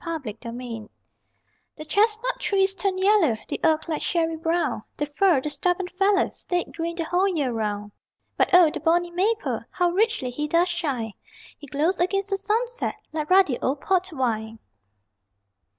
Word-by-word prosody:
_] - - -19
AUTUMN 310 -11 -4
COLORS 230 -2 -7 0.9
The 310 - -9
chestnut 440 +7 +1
trees 390 -1 +2
turned 385 -1 -1
yellow, 385 - +4
The - - -4
oak 315 0 +2
like 315 -2 -2
sherry 330 -1 0
browned, 330 +2 -1 0.2
The 295 - 0
fir, 295 0 +2
the 300 - -3
stubborn 360 +1 0
fellow, 390 +2 +2
Stayed 355 -1 -3
green 335 0 -3
the 340 - -2
whole 355 +4 +1
year 300 -9 0
round. 210 -2 -3 0.4
But - - +2
O 355 -4 +7
the - - -5
bonny 345 +1 +1
maple 415 +6 0
How 355 -1 +1
richly 405 - +1
he 300 +4 -3
does 340 +3 +2
shine! 275 - -2 0.4
He 290 - -13
glows 305 +7 0
against 390 +3 0
the 390 - +1
sunset 460 +5 -1 0.2
Like 305 -1 -3
ruddy 370 -9 +4
old 275 +2 -1
port 370 -1 +1
wine. 225 -6 -2
340 Hz, 165 wpm, -24 LUFS, 285-385 Hz, 0.9 s, O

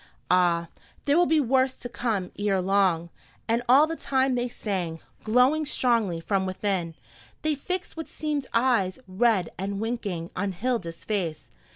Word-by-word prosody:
Ah, 175 -2 +3 0.4
there 285 - +3
will 350 +1 +4
be 320 -1 +4
worse 260 0 +2
to 245 - -7
come 220 -7 -2
ere 200 -2 +1
long!" 185 -3 +2 0.4
And 230 +1 +2
all 275 +4 +8
the 325 +1 -4
time 265 -3 +1
they 245 0 0
sang, 185 -8 -3 0.2
glowing 250 +8 +3
strongly 230 - +1
from 190 +3 0
within, 185 -3 -2 0.5
they 310 0 +2
fixed 360 +6 -4
what 320 -1 -6
seemed 300 -3 -3
eyes, 230 -6 +2
red 190 -2 +2
and 195 +1 -3
winking, 205 -7 -3
on 195 +1 -1
Hilda's 185 -5 -3
face. 165 - -3
215 Hz, 155 wpm, -26 LUFS, 185-260 Hz, 0.5 s, all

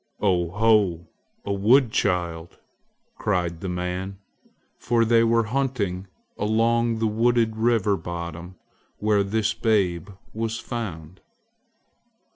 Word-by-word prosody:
"Oh 90 -4 +1
ho, 105 -4 +2 0.4
a 100 - -1
wood 115 +5 +4
child!" 85 -4 -1 0.6
cried 85 -2 -1
the 95 - -4
men, 90 +2 -4 0.6
for 115 -1 +2
they 115 0 +4
were 115 0 +3
hunting 110 -7 -2 0.3
along 115 +2 +1
the 110 - -1
wooded 115 +1 +2
river 110 -3 +2
bottom 85 +1 -7 0.4
where 105 -1 +2
this 105 +2 0
babe 100 -5 0 0.2
was 115 0 -3
found. 95 -7 -6
105 Hz, 105 wpm, -24 LUFS, 90-115 Hz, 0.6 s, wood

